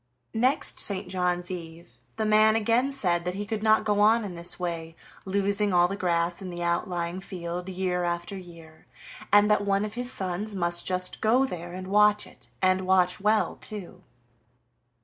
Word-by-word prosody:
Next 250 +5 +1
St. 200 -2 +2
John's 180 -1 -1
eve 170 -1 -8 0.3
the 220 - 0
man 215 +1 +5
again 230 +5 +2
said 175 -10 0
that 180 +1 -3
he 205 +1 -4
could 220 0 -3
not 220 0 +4
go 205 -1 +1
on 220 +2 +4
in 190 - -6
this 170 +1 -6
way, 165 -2 -4 0.3
losing 200 +1 0
all 175 0 +5
the 195 - -4
grass 175 -1 0
in 190 - -6
the 175 0 -5
outlying 170 +1 -2
field 180 -1 -6
year 180 -1 -1
after 175 +2 -3
year, 170 -4 -13 0.4
and 205 0 +6
that 210 - +3
one 200 +1 +1
of 210 - -6
his 245 +2 -3
sons 200 0 -3
must 175 -2 0
just 185 0 -1
go 240 +5 +3
there 175 -7 -7
and 185 0 -6
watch 210 +1 +4
it, - - -15 0.2
and 185 0 +2
watch 180 -1 +3
well 215 +2 +1
too. 210 -5 -8
185 Hz, 180 wpm, -26 LUFS, 175-210 Hz, 0.4 s, and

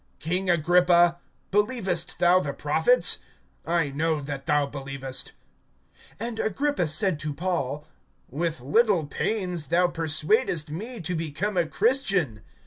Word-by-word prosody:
(27)King 180 +3 0
Agrippa, 175 +1 +4 0.3
believest 195 -5 0
thou 175 +1 +4
the - - -3
prophets? - - +2 0.5
I 165 -4 +1
know 155 +2 0
that 140 0 -6
thou 150 -2 +2
believest. 135 -2 -5 0.9
(28)And 230 0 -3
Agrippa 275 - 0
said 155 +2 +1
to 150 0 -3
Paul: 150 -4 -2 0.4
With 160 +1 -3
little 185 - +2
pains[26:28a] 180 -1 -1
thou 180 +1 +3
persuadest[26:28b] 165 - 0
me 220 +7 -5
to 175 +2 -2
become 165 +6 -3
a 175 -2 +1
Christian. 195 - +1
170 Hz, 125 wpm, -25 LUFS, 150-195 Hz, 0.9 s, Agrippa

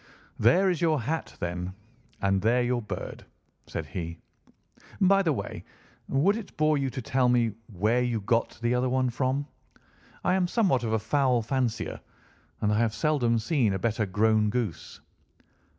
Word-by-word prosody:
"There 155 - +5
is 175 - -3
your 160 -3 +2
hat, 160 +6 -3
then, 90 +2 -4 0.5
and 95 -1 +2
there 120 +4 +3
your 120 0 0
bird," 105 - -6 0.4
said - - -4
he. 85 -2 -5 0.8
"By 195 0 +5
the 170 -5 +1
way, 140 - -4 0.4
would 160 +10 +2
it 225 - -9
bore 155 0 +3
you 135 -1 0
to 130 0 -6
tell 125 +1 +2
me 120 -2 +3 0.2
where 110 +6 +1
you 120 -2 0
got 115 +3 0
the 120 +1 +2
other 125 +1 +1
one 130 -1 +1
from? 130 +3 -1 0.8
I - - +2
am 185 -1 +2
somewhat 180 - +2
of 110 - -1
a - - +3
fowl 125 +1 +1
fancier, 125 -1 -2 0.6
and 105 0 +2
I 105 - +2
have 115 -1 +1
seldom 135 -7 +2
seen 115 -2 +1
a - - 0
better 110 +1 -1
grown 105 +2 +2
goose." 110 -7 -4
120 Hz, 165 wpm, -27 LUFS, 110-140 Hz, 0.8 s, There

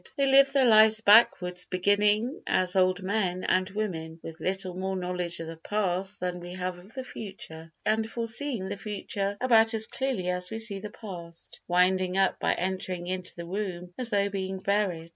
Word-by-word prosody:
They 275 - +3
live 275 0 +6
their 275 -2 +3
lives 220 -1 +6
backwards, 180 -5 +5
beginning, 210 - +1
as 185 0 +1
old 185 0 +2
men 185 -2 -1
and 185 +1 +1
women, 170 -6 -4
with 165 0 -8
little 190 -1 -2
more 190 +1 -3
knowledge 180 -1 -2
of 165 - -5
the 165 0 -8
past 190 +1 -2
than 180 -1 -2
we 175 0 -8
have 180 -1 -4
of 195 +5 -16
the 260 - -4
future, 165 -9 -8
and 220 +1 +1
foreseeing 230 -2 -1
the 200 +1 -4
future 200 -1 -3
about 225 -2 +4
as 220 0 +2
clearly 260 -8 -3
as 180 0 -1
we 220 - -4
see 220 -3 -2
the 210 +2 -7
past, 175 -6 -10
winding 185 +1 +2
up 195 0 +2
by - - +1
entering 185 -1 -3
into 185 0 -3
the 170 - -7
womb 180 -1 -5
as 250 -2 -2
though 200 -2 +2
being 190 -1 -3
buried. 190 -4 -1
190 Hz, 185 wpm, -28 LUFS, 180-215 Hz, -, live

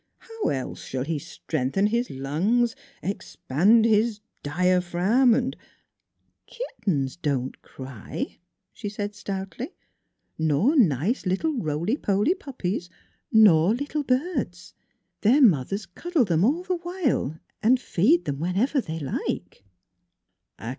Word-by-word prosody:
" - - -51
How 450 -1 -4
else 130 -2 -4
shall 130 -1 -3
he 155 +1 -2
strengthen 155 +6 -2
his 235 +4 0
lungs, 185 - 0 0.3
expand 200 - +2
his 220 0 +3
er - - -33 0.2
diaphragm 180 - +3
and 260 +1 -1 0.3
' - - -56
" - - -48
Kittens 185 - -2
don't 140 -6 -2
cry," 130 -5 -7 0.3
she 205 - -5
said 205 0 -4
stoutly, 195 - -6 0.4
" - - -53 0.2
nor 160 - +2
nice 190 - +2
little 285 - 0
roly 170 - -1
poly 205 - +2
puppies, 205 - -4 0.4
nor 205 -3 +6
little 285 +3 -2
birds; 255 - -2 0.5
their 245 +8 +5
mothers 195 - +3
cuddle 325 - 0
them 170 -3 +2
all 300 - +2
the 365 -1 -1
while 345 - -1 0.2
and 245 +4 +4
feed 250 - +2
them 140 -1 -3
whenever 200 - +1
they 160 -7 -5
like." 135 -7 -4
200 Hz, 125 wpm, -25 LUFS, 160-255 Hz, 0.5 s, nor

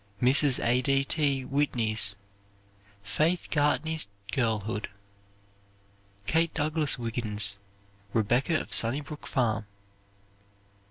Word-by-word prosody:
Mrs. 135 +2 +4
A. 120 +2 +3
D. 135 +1 +2
T. 140 -3 +1
Whitney's 110 -8 +1 0.9
"Faith 155 - 0
Gartney's 155 -1 +1 0.2
Girlhood." 110 -4 -1 1.4
Kate 165 +7 +1
Douglas 150 -1 +1
Wiggin's 105 -4 -3 0.5
"Rebecca 120 +9 +1
of - - -8
Sunnybrook 145 +6 +1
Farm." 110 -5 -1
130 Hz, 85 wpm, -28 LUFS, 110-150 Hz, 1.4 s, Mrs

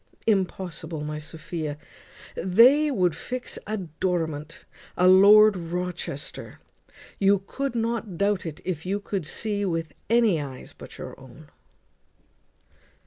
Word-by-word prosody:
Impossible! 180 -6 -1
my 150 0 -4
Sophia; 155 -1 -6 0.6
they 245 - +5
would 180 - +1
fix 250 0 -5
a 215 +1 -2
Dorimant, 165 -3 -3 0.3
a 180 - +4
Lord 205 +3 +8
Rochester. 175 -4 -5 0.6
You 200 0 +4
could 275 +3 -3
not 225 -5 -2
doubt 200 0 +1
it, 160 +2 -7
if 170 -4 -3
you 195 +3 -1
could 195 -5 -4
see 210 +4 -2
yourself 200 -3 0
with 165 -2 -3 0.2
any 225 -8 +3
eyes 135 -3 -9
but - - -12
your - - -8
own." 130 +4 -15
180 Hz, 125 wpm, -25 LUFS, 160-210 Hz, 0.6 s, Lord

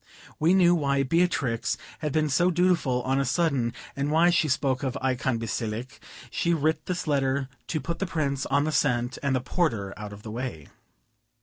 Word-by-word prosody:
We 165 +4 +4
knew 175 -2 +5
why 140 -4 +1
Beatrix 135 -6 +1 0.2
had 150 -2 -2
been 155 +1 +2
so 175 +6 +3
dutiful 170 -8 +2
on 135 +1 +1
a - - +2
sudden, 135 -4 +1 0.2
and 140 +1 -1
why 165 +3 +4
she 165 -2 +2
spoke 135 -2 0
of 130 -1 -2
"Eikon 130 -1 0
Basilike." 115 +3 -4 0.3
She 170 0 +1
writ 155 0 0
this 180 0 -2
letter 135 -2 0 0.2
to 155 - -1
put 170 +2 -4
the 195 - -1
Prince 140 -5 -1
on 140 +1 +2
the 155 - -1
scent, 125 -4 +1
and 140 -2 +1
the 130 - 0
porter 115 - -1
out 105 -1 -7
of 105 +1 -11
the 110 - -7
way. 115 - -5
140 Hz, 190 wpm, -26 LUFS, 125-160 Hz, 0.3 s, knew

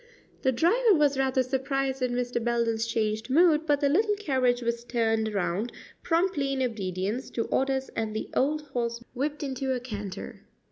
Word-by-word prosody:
The 260 - +3
driver 415 - +4
was 295 -3 +3
rather 265 -1 +2
surprised 265 +1 -1
at 255 - +1
Mr. 245 -1 -1
Belden's 230 -1 0
changed 220 0 -1
mood, 320 +2 +4
but 290 -1 +2
the 285 - +4
little 415 +8 +3
carriage 260 -10 +1
was 235 0 -1
turned 225 -2 0
round 200 +3 -1 0.3
promptly 330 -5 +1
in 265 -1 0
obedience 205 0 -2
to 230 - -1
orders, 265 0 0
and 220 -1 -3
the 220 - -3
old 300 +3 +1
horse 235 -2 -2
whipped 295 +4 -2
into 265 -1 -2
a - - -2
canter. 210 -5 -7
255 Hz, 170 wpm, -27 LUFS, 230-280 Hz, 0.3 s, driver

